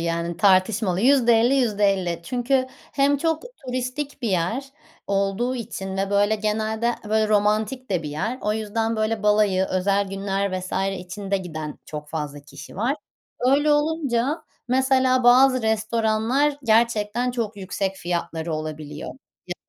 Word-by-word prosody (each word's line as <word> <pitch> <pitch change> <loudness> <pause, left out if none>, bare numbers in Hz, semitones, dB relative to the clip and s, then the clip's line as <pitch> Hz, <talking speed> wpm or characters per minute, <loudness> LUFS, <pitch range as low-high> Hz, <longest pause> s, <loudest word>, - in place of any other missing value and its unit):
yani 170 0 -2
tartışmalı. 190 -1 +3
%50-%50. 225 -8 +3
Çünkü 255 +6 0 0.3
hem 280 +1 +3
çok 320 +2 -1 0.2
turistik 255 +3 -4
bir 230 - 0
yer 185 +9 0 0.4
olduğu 200 +5 0
için 200 -5 -5
ve 195 0 -1
böyle 205 +1 +3
genelde 220 +2 -1
böyle 215 0 +2
romantik 215 +4 +1
de 180 -3 0
bir 150 - -5
yer. 205 - -3
O 210 - 0
yüzden 220 +1 -1
böyle 215 0 -1
balayı 210 -3 +3
özel 195 +2 +1
günler 195 0 -2
vs. 185 - -8 0.3
için 195 +2 -8
de 200 - +3
giden 155 -5 -6
çok 150 -1 -7
fazla 150 -2 -5
kişi 145 +4 -12
var. 240 +8 0 0.4
Öyle 280 +4 +3
olunca 295 -2 0 0.3
mesela 260 0 +3
bazı 255 +1 +6
restoranlar 220 +5 +1
gerçekten 230 +1 +2
çok 230 -4 -3
yüksek 195 0 -3
fiyatları 170 -2 -3
olabiliyor. 155 -1 -6 0.4
Ya 180 - -4
215 Hz, 135 wpm, -23 LUFS, 190-245 Hz, 0.4 s, bazı